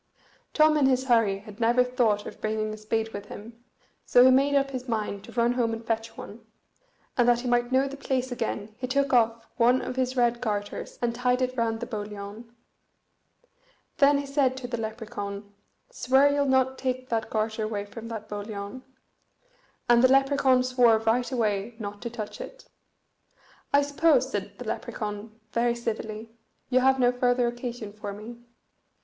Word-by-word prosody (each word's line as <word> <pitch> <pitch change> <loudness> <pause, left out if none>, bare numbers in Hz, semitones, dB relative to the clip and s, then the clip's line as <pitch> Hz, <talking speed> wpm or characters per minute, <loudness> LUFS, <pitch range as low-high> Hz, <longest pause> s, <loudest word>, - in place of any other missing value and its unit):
Tom 310 0 +5
in 280 -3 +4
his 260 -1 +2
hurry 230 -6 +3
had 210 0 -12
never 240 +2 +4
thought 235 -5 +1
of - - -9
bringing 215 0 -1
a - - -7
spade 220 +1 -2
with 205 0 -7
him, 230 +4 -11 0.4
so 245 0 +6
he 260 - +7
made 275 +2 +3
up 275 0 +2
his 255 -1 -5
mind 210 -3 -2
to - - -12
run 240 0 +2
home 235 -2 0
and 225 0 -6
fetch 225 0 -3
one; 225 +3 -10 0.7
and 245 -1 +4
that 240 0 +3
he 255 - -4
might 240 0 +1
know 265 +1 +3
the 275 - -7
place 260 -2 -2
again 220 -3 -3
he 255 - -3
took 275 +1 0
off 230 -1 +2
one 245 +1 +4
of 255 - -5
his 255 0 -1
red 240 -1 +2
garters, 205 -3 -4
and 235 -1 +1
tied 250 +1 +1
it 255 0 -1
round 225 -2 0
the - - -2
boliaun. 210 0 -7 1.5
Then 280 0 +5
he 285 - -3
said 275 -2 +1
to 255 -2 -6
the 240 - -3
Lepracaun, 210 -2 -6 0.4
"Swear 265 +3 +3
ye'll 285 -1 +1
not 260 0 +2
take 255 -1 -3
that 225 -1 -1
garter 220 0 -1
away 215 -2 -2
from 230 +2 -9
that 225 -2 -6
boliaun." 205 +2 -6 1.1
And 240 0 +5
the 255 - +6
Lepracaun 270 -1 +4
swore 250 -3 +4
right 225 +4 0
away 220 -2 -1
not 205 -2 -7
to 235 - -4
touch 225 - -7
it. - - -10 1.1
"I 285 0 +4
suppose," 295 +3 +2
said - - -4
the - - -8
Lepracaun, 215 +1 -5
very 235 0 +1
civilly, 225 -1 -5 0.4
"you 255 - +5
have 265 +1 +3
no 245 -1 +4
further 245 0 +1
occasion 240 -3 -5
for 205 -1 -6
me?" 225 +4 -10
235 Hz, 180 wpm, -26 LUFS, 220-255 Hz, 1.5 s, he